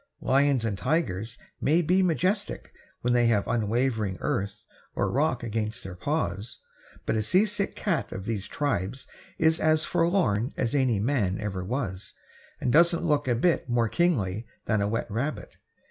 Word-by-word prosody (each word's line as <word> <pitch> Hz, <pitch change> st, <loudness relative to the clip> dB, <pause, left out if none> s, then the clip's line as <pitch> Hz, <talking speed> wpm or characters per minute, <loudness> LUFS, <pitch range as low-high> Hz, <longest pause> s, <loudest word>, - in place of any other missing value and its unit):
Lions 135 Hz, -3 st, +2 dB
and 100 Hz, -4 st, -2 dB
tigers 115 Hz, -, -1 dB, 0.2 s
may 160 Hz, +5 st, +3 dB
be 180 Hz, +4 st, +3 dB
majestic 185 Hz, +4 st, 0 dB, 0.3 s
when 125 Hz, 0 st, +1 dB
they 120 Hz, -1 st, +4 dB
have 110 Hz, -3 st, +2 dB
unwavering 110 Hz, -3 st, 0 dB
earth 100 Hz, +1 st, -2 dB, 0.3 s
or -, -, 0 dB
rock 130 Hz, -3 st, +1 dB
against 110 Hz, -1 st, -3 dB
their 95 Hz, -, -7 dB
paws, 105 Hz, -, -2 dB, 0.5 s
but -, -, 0 dB
a 110 Hz, -, +1 dB
seasick 200 Hz, -, +1 dB
cat 180 Hz, -6 st, -1 dB
of 95 Hz, 0 st, -6 dB
these 105 Hz, -3 st, -3 dB
tribes 130 Hz, -2 st, -2 dB, 0.3 s
is 160 Hz, 0 st, +3 dB
as 155 Hz, 0 st, +3 dB
forlorn 165 Hz, -, +1 dB
as 120 Hz, -3 st, 0 dB
any 130 Hz, -6 st, +2 dB
man 105 Hz, -4 st, 0 dB
ever 95 Hz, -3 st, -3 dB
was, 95 Hz, -4 st, -3 dB, 0.4 s
and 125 Hz, -, 0 dB
doesn't 170 Hz, +2 st, +4 dB
look 145 Hz, -4 st, +1 dB
a 120 Hz, -, +3 dB
bit 155 Hz, +2 st, +1 dB
more 120 Hz, -1 st, +2 dB
kingly 110 Hz, -, 0 dB, 0.2 s
than 110 Hz, -2 st, +1 dB
a 100 Hz, -, +1 dB
wet 115 Hz, +2 st, -1 dB
rabbit. 135 Hz, +8 st, -3 dB
120 Hz, 160 wpm, -27 LUFS, 105-155 Hz, 0.5 s, they